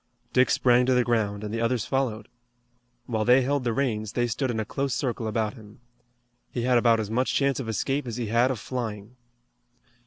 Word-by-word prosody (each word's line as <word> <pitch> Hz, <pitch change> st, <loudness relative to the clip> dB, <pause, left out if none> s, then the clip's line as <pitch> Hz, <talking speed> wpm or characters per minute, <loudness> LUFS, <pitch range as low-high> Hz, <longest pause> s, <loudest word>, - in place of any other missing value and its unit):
Dick 125 Hz, 0 st, +4 dB
sprang 125 Hz, 0 st, +3 dB
to 130 Hz, -, +3 dB
the 125 Hz, -, +4 dB
ground, 110 Hz, -4 st, 0 dB
and 105 Hz, 0 st, -5 dB
the 115 Hz, -, -2 dB
others 115 Hz, -1 st, 0 dB
followed. 120 Hz, -6 st, -1 dB, 0.8 s
While 110 Hz, -3 st, -1 dB
they 125 Hz, +3 st, +5 dB
held 140 Hz, +1 st, 0 dB
the 120 Hz, -, 0 dB
reins 110 Hz, -4 st, -1 dB
they 120 Hz, -, +1 dB
stood 125 Hz, +3 st, -2 dB
in 115 Hz, -2 st, -2 dB
a 110 Hz, -, -2 dB
close 135 Hz, +2 st, -2 dB
circle 120 Hz, -4 st, -2 dB
about 110 Hz, 0 st, -1 dB
him. 110 Hz, -2 st, -15 dB, 0.7 s
He 120 Hz, -, -3 dB
had 125 Hz, -1 st, +4 dB
about 115 Hz, -1 st, +4 dB
as 110 Hz, -1 st, -3 dB
much 125 Hz, +3 st, 0 dB
chance 140 Hz, -1 st, +1 dB
of 120 Hz, -4 st, -4 dB
escape 135 Hz, +5 st, -1 dB
as 115 Hz, -1 st, -4 dB
he 120 Hz, -, -2 dB
had 115 Hz, +4 st, +2 dB
of 130 Hz, -, -1 dB
flying. 110 Hz, -1 st, -5 dB
120 Hz, 210 wpm, -26 LUFS, 110-130 Hz, 0.8 s, they